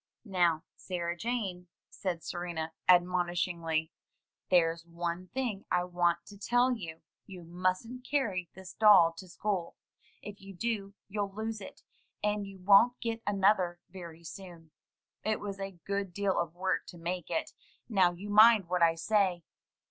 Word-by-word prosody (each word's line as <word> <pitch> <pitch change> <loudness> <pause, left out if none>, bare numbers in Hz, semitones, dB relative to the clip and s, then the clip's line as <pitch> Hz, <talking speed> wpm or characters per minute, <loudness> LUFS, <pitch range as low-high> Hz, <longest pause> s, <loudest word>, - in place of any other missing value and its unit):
"Now, 175 -5 +2
Sarah 175 -2 -3
Jane," 195 -4 -3 0.2
said 175 -4 -3
Serena 170 -2 -4 0.2
admonishingly, 175 -2 +2 0.6
"there's 165 -2 +3
one 170 +1 -4
thing 235 -4 -3
I 180 0 +2
want 175 -1 0
to 200 -1 -13
tell 245 +4 +3
you: 165 -7 -8 0.2
you 185 -3 -10
mustn't 185 +9 -2
carry 210 - -1
this 190 -1 -10
doll 195 -6 +7
to 185 - -9
school. 190 -2 -2 0.5
If 205 -1 -9
you 195 0 -11
do, 205 -1 -3
you'll 200 -1 -2
lose 220 0 -4
it; 190 - -11 0.4
and 210 -1 0
you 195 -1 -10
won't 200 +6 +5
get 230 -1 -3
another 195 -3 +2
very 170 -3 -10
soon. 170 -2 -10 0.5
It 215 0 0
was 200 -1 -6
a 195 -2 -6
good 200 -2 -2
deal 200 -2 +1
of 170 -1 -2
work 190 +1 -1
to 175 - -10
make 175 0 -4
it. 320 - -2 0.3
Now 190 -6 +4
you 195 +4 -7
mind 215 -2 +7
what 180 -1 0
I 165 -1 +5
say." 185 0 +1
185 Hz, 150 wpm, -31 LUFS, 175-205 Hz, 0.6 s, doll